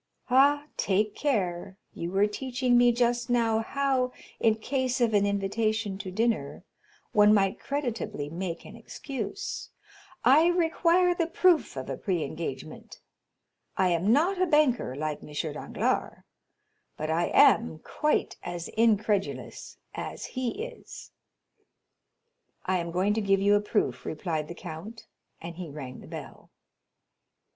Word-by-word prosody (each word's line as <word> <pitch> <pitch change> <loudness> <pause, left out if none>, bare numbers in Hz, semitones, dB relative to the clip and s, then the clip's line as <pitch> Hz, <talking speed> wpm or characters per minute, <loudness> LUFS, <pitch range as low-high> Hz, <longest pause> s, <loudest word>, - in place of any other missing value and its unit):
"Ah, 285 +3 +5
take 205 +2 +1
care, 190 -8 -1 0.2
you 170 - -4
were 195 +2 +3
teaching 250 +3 0
me 245 0 +6
just 240 0 0
now 230 -2 +2
how, 260 +1 0 0.3
in 220 -1 +3
case 255 +3 -1
of 235 -2 +2
an 205 -1 +3
invitation 200 0 -1
to 190 - -5
dinner, 200 -8 -1 0.5
one 210 0 +6
might 195 -2 +2
creditably 240 - -3
make 170 +2 -5
an - - -11
excuse. 280 - -6 0.6
I 290 +7 +6
require 350 +1 +3
the 340 -2 -1
proof 345 - +3
of 130 - -5
a 135 - -4
pre 180 -5 -1
engagement. 150 0 -7 0.8
I 185 - +3
am 175 +4 +2
not 355 +9 +2
a 370 - +3
banker, 290 - +2
like 150 +1 -3
M. - - -11 0.2
Danglars, 150 - -2 0.7
but 155 +1 -2
I 170 +2 +1
am 220 -8 +4
quite 300 - -1
as 175 -1 -5
incredulous 215 -3 0 0.2
as - - -6
he 255 - -2
is." - - -11 1.5
"I 185 0 +1
am 170 0 -4
going 185 +4 +1
to 220 - 0
give 195 -1 +2
you 200 +1 +4
a 205 - +4
proof," 210 0 -1
replied 155 -1 -3
the 170 - -8
count, 195 +9 -9 0.3
and 170 0 -8
he 180 -3 -6
rang 135 -3 -8
the - - -13
bell. - - -9
215 Hz, 140 wpm, -28 LUFS, 175-255 Hz, 1.5 s, me